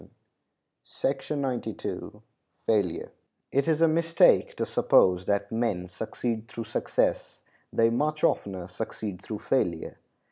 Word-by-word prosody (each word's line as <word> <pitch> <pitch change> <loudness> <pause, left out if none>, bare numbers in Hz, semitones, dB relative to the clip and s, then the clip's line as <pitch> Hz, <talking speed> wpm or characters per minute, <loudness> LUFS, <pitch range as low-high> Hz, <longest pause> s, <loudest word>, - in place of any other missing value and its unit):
] - - -20
It 135 -2 -2 1.7
is 155 +3 +2
a 165 - +7
mistake 165 +1 +4
to - - -1
suppose 90 0 +3
that 100 0 0
men 110 -6 -1
succeed 110 +4 -4
through 115 - -6
success; 110 - -1 0.3
they 115 0 +3
much 150 +5 0
oftener 95 -3 +1
succeed 100 0 -5
through 105 +2 -5
failure. 90 -9 -1
115 Hz, 105 wpm, -27 LUFS, 100-140 Hz, 1.7 s, a